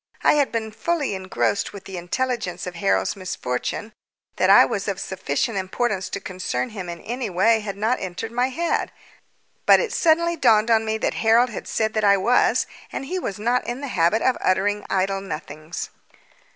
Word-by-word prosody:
I - - +6
had 290 -2 +2
been 220 -1 -3
fully 300 +2 -1
engrossed 190 +2 -1
with 200 -1 -10
the 190 - -8
intelligence 190 0 -2
of 180 - -5
Harold's 95 - +1
misfortune 185 - -4 0.4
that - - +3
I - - +8
was - - -3
of - - -2
sufficient 225 -5 -2
importance 190 +1 -2
to 200 - -4
concern 180 -11 -3
him 190 -5 -6
in 170 -1 -7
any 240 -1 -4
way 215 +5 +3
had 200 -2 -5
not 225 +5 +1
entered 185 +5 -5
my 245 +2 +1
head; 335 +6 -1 0.8
but - - +8
it 475 - -2
suddenly 340 +1 +3
dawned 230 -6 +4
on 225 -1 +4
me 220 0 -1
that - - -1
Harold 230 +2 +4
had - - -7
said 220 0 0
that 215 - 0
I 200 -1 +5
was, 240 +6 +3 0.3
and - - -4
he 370 +6 -3
was 200 - -4
not 240 +4 +1
in 245 +3 -4
the 280 - -4
habit 175 +3 +2
of 255 - +2
uttering 205 +2 +1
idle 195 0 0
nothings. 155 -2 -6
215 Hz, 190 wpm, -23 LUFS, 185-245 Hz, 0.8 s, I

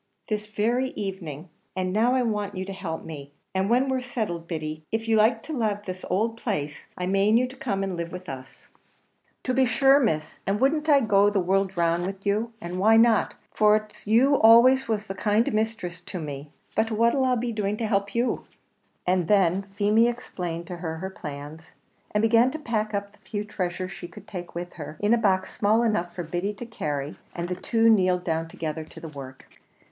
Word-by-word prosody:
"This 210 -1 -2
very 235 +5 0
evening; 180 -5 -5 0.3
and 185 -1 -1
now 235 +5 +3
I 255 - +2
want 210 -4 -2
you 185 - -3
to 195 - -6
help 175 -5 -5
me, 145 -3 -8 0.2
and 190 +1 0
when 250 +3 +3
we're 260 -1 0
settled, 215 -9 -4
Biddy, 155 -2 -4
if 225 0 -2
you 225 - +3
like 225 +1 +3
to 315 - -6
lave 215 -6 -1
this 185 0 -6
ould 225 +4 0
place, 150 - -3
I 180 - -2
mane 195 +4 +3
you 250 +1 +2
to 260 - -11
come 200 -7 -2
and 190 -2 -2
live 170 0 -4
with 180 0 -8
us." 130 -2 -9 0.7
"To 255 - -1
be 265 +1 +4
shure, 270 +4 +5
Miss; 155 - -1
and 200 +1 +1
wouldn't 300 +4 +2
I 285 -2 +6
go 205 -3 +4
the 205 -1 +1
world 190 +1 +1
round 170 +1 +1
wid 195 0 -4
you? 215 +3 0
and 180 -2 -5
why 220 +3 +6
not? 225 -1 +4 0.2
for 210 0 +4
it's 215 -1 -5
you 240 +6 +5
was 280 - +4
always 245 +4 +7 0.2
the 195 - -5
kind 210 +3 +1
misthress 215 -5 -2
to 180 - -6
me. 145 -2 -6 0.2
But 225 - +1
what'll 235 +4 +2
I 255 -1 +3
be 240 0 -2
doing 210 -1 -1
to 230 - -2
help 200 -1 0
you?" 240 +2 0 0.6
And 180 -2 +1
then 195 -1 +3
Feemy 210 +3 +4
explained 175 -8 -4
to 180 -1 -6
her 165 -2 -4
her 190 +3 -5
plans, 155 0 -9 0.3
and 210 +1 0
began 230 +2 +5
to 300 - -5
pack 220 -7 -2
up 200 0 -3
the 205 - -24
few 205 -2 -4
treasures 185 -3 -3
she 195 -2 -8
could - - -13
take 175 -4 -7
with 175 +1 -5
her, 155 -2 -8
in 205 +2 +3
a - - +5
box 190 -4 +1
small 220 +3 +3
enough 210 -7 0
for 175 - -3
Biddy 175 +5 -3
to 240 - -7
carry; 145 -10 -4 0.2
and 170 0 -3
the 180 - -2
two 225 +5 +2
kneeled 185 -5 +4
down 165 -1 -1
together 160 -1 -4
to 155 - -13
the 165 - -8
work. 135 -3 -10
200 Hz, 215 wpm, -26 LUFS, 175-225 Hz, 0.7 s, always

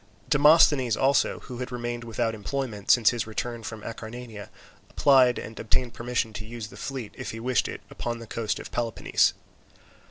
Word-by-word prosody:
Demosthenes 145 -5 +6
also, 135 +1 +2
who 125 -2 -8
had 125 0 -5
remained 120 0 -4
without 115 0 -1
employment 110 -1 -4
since 120 -4 +6
his 120 -2 -3
return 115 +2 -4
from 110 0 -7
Acarnania, 115 -1 -8 0.4
applied 130 -3 +5
and 110 - -7
obtained 120 +2 0
permission 120 -2 -2
to 105 - -6
use 110 -1 -7
the - - -13
fleet, 130 -6 -6
if - - -4
he 115 - -6
wished 125 0 +1
it, - - -6
upon 120 0 -4
the 115 - -9
coast 110 0 -2
of - - -9
Peloponnese. 115 -2 +1
120 Hz, 170 wpm, -26 LUFS, 110-125 Hz, 0.4 s, Demosthenes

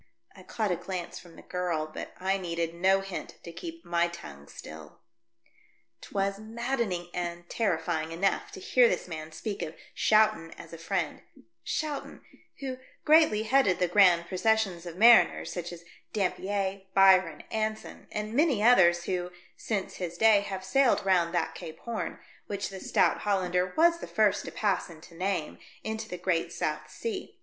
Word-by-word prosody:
I - - -13
caught 215 -4 -2
a - - +2
glance 180 0 -6
from 175 -2 -15
the - - -14
girl, 175 -4 -2
but 155 - -8
I 190 +1 0
needed 170 -2 -3
no 190 +3 +3
hint 195 -1 -7
to 170 - -8
keep 165 0 -9
my 170 0 +1
tongue 70 - -10
still. 80 +1 -11 1.0
'Twas 195 0 -2
maddening 225 -5 -3
and 175 0 -4
terrifying 165 -6 -1
enough 195 - 0
to 395 - -8
hear 250 -10 +4
this 180 - -2
man 160 -2 -7
speak 195 +6 -5
of 160 -1 -5 0.2
Schouten 215 -7 +2
as 165 - -11
a 165 - -8
friend 170 -2 -2 0.2
— 115 0 -47
Schouten, 300 -2 -4 0.4
who 260 -2 -4 0.3
greatly 310 -9 +5
headed 225 -6 +3
the 180 - +1
grand 175 -2 +5
procession 220 0 +1
of 170 0 -8
mariners 230 +3 +6
such 175 -1 -5
as 170 -1 -10 0.3
Dampier, 195 -1 -1
Byron, 190 -3 +5
Anson, 215 0 -3
and 210 +1 -4
many 275 -6 +2
others 175 -8 +5
who, 180 0 -2 0.3
since 200 -4 -3
his 175 -2 -5
day, 220 0 +6
have 190 -2 -6
sailed 255 +2 +3
round 180 -3 +3
that 170 - 0
Cape 160 0 -9
Horn 235 -2 -4
— - - -28
which 200 -1 -3
the 195 -1 -8
stout - - +2
Hollander 180 -3 0
was 335 +1 +5
the - - -7
first 215 -2 +2
to - - -6
pass 205 -4 -1
and 160 -1 -13
to - - -15
name 180 -2 -2
— - - -25
into 220 0 -4
the 180 - -5
great 175 -2 -1
South - - -3
Sea. 420 -5 -6
190 Hz, 175 wpm, -28 LUFS, 170-215 Hz, 1.0 s, mariners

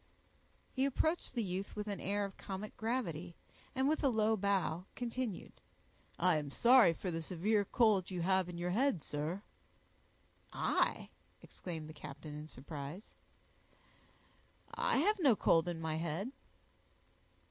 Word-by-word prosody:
He 265 +1 +1
approached 315 +2 0
the 235 - +1
youth 190 0 -4
with 210 -1 -3
an 200 -1 -3
air 205 +1 0
of 195 - -8
comic 200 +2 -6
gravity, 180 - -2 0.4
and 265 +1 +2
with 310 +1 +1
a 275 - +5
low 220 -2 +3
bow, 190 -4 0
continued, 240 -4 -4 0.6
"I 180 -2 +3
am 150 -2 -3
sorry 235 - +6
for 180 +2 -4
the 165 0 -2
severe 200 +6 +1
cold 210 -4 +3
you 180 -2 -3
have 190 0 +2
in 175 - -6
your 175 +1 -1
head, 240 - +2
sir." 155 +7 -3 1.1
"I!" - - +1 0.3
exclaimed 160 -4 -7
the 155 - -9
captain, 150 0 -9
in 150 +1 -7
surprise; 145 - -8 1.6
"I - - +1
have 405 +9 +3
no 275 -10 +5
cold 165 -3 +3
in 175 -2 -2
my 160 -1 -2
head." 170 +8 -2
190 Hz, 145 wpm, -35 LUFS, 165-225 Hz, 1.6 s, sorry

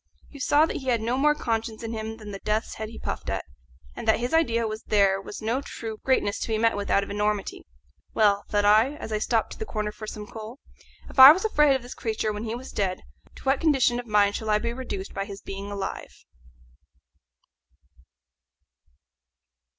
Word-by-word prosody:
You 285 - -11
saw 290 +3 +4
that - - -4
he 265 - -8
had 240 -2 +2
no 230 +3 -1
more 300 +3 +3
conscience 225 -4 -3
in 225 - -4
him 220 0 -5
than 210 -2 -9
the 195 - -7
death's 215 +2 -1
head 220 -1 -6
he 225 - -11
puffed - - -5
at, - - -2 0.5
and - - -7
that 220 - +4
his 245 +4 -3
idea 235 -8 +2
was 215 0 -5
there 195 -2 +2
was 205 +2 -9
no 235 +5 0
true 225 -5 -7
greatness 255 -6 +1
to - - -3
be 220 -1 0
met 230 +1 +2
with 205 0 -4
out 200 - +3
of 200 - -7
enormity. 210 - -2 0.5
Well, 205 -2 +3
thought 205 -1 +1
I, 220 +7 +4
as 225 - -8
I 215 - 0
stepped 225 +1 0
to - - -9
the 440 - -3
corner 210 -1 -3
for 215 0 -9
some 210 -1 -7
coal, 220 +3 -9 0.5
if - - -5
I 265 +2 +13
was 375 +7 0
afraid 300 -9 +4
of 260 - -3
this 245 - -8
creature 220 -1 -2
when 210 +2 -5
he 225 +1 -3
was 255 +2 -9
dead, 190 -3 -2 0.3
to - - -13
what 270 0 +1
condition 270 -6 +3
of 245 - -8
mind 205 -1 +3
shall 220 - -4
I 210 - +4
be 235 +2 -3
reduced 235 -6 -6
by 195 0 -3
his 200 -1 -8
being 195 0 -7
alive? 200 -1 -6
220 Hz, 210 wpm, -26 LUFS, 210-245 Hz, 0.5 s, I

